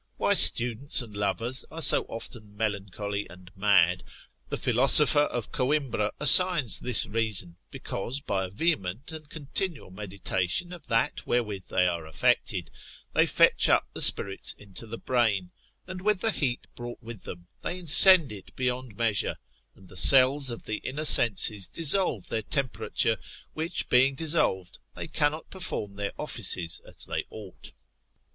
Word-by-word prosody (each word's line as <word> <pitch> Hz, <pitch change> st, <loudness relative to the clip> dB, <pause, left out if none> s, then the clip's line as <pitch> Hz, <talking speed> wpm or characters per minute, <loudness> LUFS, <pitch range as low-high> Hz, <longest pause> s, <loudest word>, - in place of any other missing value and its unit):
Why -, -, +1 dB
students 125 Hz, +3 st, +3 dB
and 110 Hz, -3 st, -14 dB
lovers 105 Hz, +6 st, -2 dB
are 160 Hz, -, -9 dB
so -, -, +3 dB
often 110 Hz, -2 st, -8 dB
melancholy 105 Hz, -1 st, -5 dB
and 90 Hz, 0 st, -16 dB
mad, 95 Hz, -3 st, +1 dB, 0.5 s
the -, -, -4 dB
philosopher -, -, +4 dB
of 120 Hz, -3 st, -6 dB
Conimbra 130 Hz, -6 st, -2 dB
assigns 160 Hz, -, +5 dB
this 125 Hz, -4 st, +3 dB
reason, 100 Hz, -6 st, -1 dB
because 120 Hz, +8 st, -5 dB
by 100 Hz, -9 st, -4 dB
a -, -, -9 dB
vehement 110 Hz, -, -3 dB
and 155 Hz, -2 st, -11 dB
continual 155 Hz, -, -5 dB
meditation 100 Hz, -, -4 dB
of 170 Hz, -4 st, -12 dB
that 115 Hz, 0 st, -2 dB
wherewith 105 Hz, -6 st, -3 dB
they 90 Hz, -, -1 dB
are 85 Hz, -3 st, -4 dB
affected, 80 Hz, -2 st, -2 dB, 0.4 s
they -, -, +2 dB
fetch -, -, +2 dB
up -, -, +1 dB
the -, -, -6 dB
spirits 100 Hz, -1 st, +2 dB
into 105 Hz, +3 st, -8 dB
the 115 Hz, +1 st, -8 dB
brain, 110 Hz, -9 st, -2 dB, 0.3 s
and 185 Hz, 0 st, -9 dB
with 205 Hz, -1 st, -1 dB
the 225 Hz, -, +2 dB
heat 130 Hz, -9 st, -4 dB
brought 120 Hz, 0 st, -11 dB
with 115 Hz, -3 st, -11 dB
them, 85 Hz, 0 st, -11 dB
they 175 Hz, -, -4 dB
incend 180 Hz, -, +8 dB
it 100 Hz, -3 st, -13 dB
beyond 125 Hz, -3 st, -5 dB
measure: 115 Hz, -3 st, -2 dB, 0.4 s
and 95 Hz, -, -20 dB
the 95 Hz, -, -16 dB
cells 135 Hz, -, +5 dB
of 115 Hz, -, -8 dB
the 110 Hz, -, -5 dB
inner 150 Hz, +4 st, -7 dB
senses 105 Hz, -6 st, +4 dB
dissolve 165 Hz, -, +1 dB
their 110 Hz, -, -4 dB
temperature, 130 Hz, +3 st, -2 dB, 0.4 s
which 160 Hz, +3 st, -4 dB
being 130 Hz, +2 st, +2 dB
dissolved, 135 Hz, -, -2 dB, 0.2 s
they -, -, -7 dB
cannot 155 Hz, 0 st, -2 dB
perform 180 Hz, -, -6 dB
their 100 Hz, 0 st, -5 dB
offices 95 Hz, -, -1 dB
as -, -, -7 dB
they -, -, -5 dB
ought. 105 Hz, -4 st, -13 dB
115 Hz, 150 wpm, -25 LUFS, 100-145 Hz, 0.5 s, incend